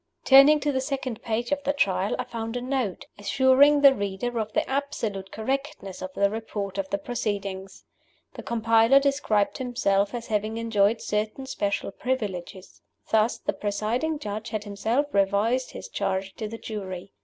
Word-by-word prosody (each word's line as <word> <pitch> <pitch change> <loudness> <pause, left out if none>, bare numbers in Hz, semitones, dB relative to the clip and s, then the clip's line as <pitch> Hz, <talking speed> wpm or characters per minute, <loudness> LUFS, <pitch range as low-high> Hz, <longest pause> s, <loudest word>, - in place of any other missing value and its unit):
Turning 280 +3 +8
to 290 0 0
the 260 -1 0
second 265 -4 -4
page 235 +2 -2
of 285 0 0
the 285 - +1
Trial, 195 -7 +1
I - - -2
found 225 +1 -5
a - - -3
Note, 255 -6 -2
assuring 265 +6 +4
the 275 -1 +8
reader 205 +2 -3
of 215 -1 -3
the - - 0
absolute 225 -8 -3
correctness 265 -4 -4
of 185 0 -5
the 200 - +3
Report 205 -3 -4
of 190 -1 -3
the 200 - 0
Proceedings. 200 -4 -4 0.5
The - - -8
compiler 230 +3 +4
described 275 -8 +1
himself 205 -5 0
as 235 -1 -5
having 215 0 -1
enjoyed 225 -1 +2
certain 215 +5 -2
special 205 -6 -2
privileges. 195 -7 -4 0.3
Thus, 220 +1 +3
the - - -2
presiding 225 +9 -1
Judge 215 -4 -5
had 215 -1 -3
himself 220 +7 0
revised 205 +6 +2
his - - -8
charge 195 -1 -2
to 215 - -4
the 225 +2 -7
jury. 195 -4 -7
220 Hz, 165 wpm, -26 LUFS, 200-260 Hz, 0.5 s, Turning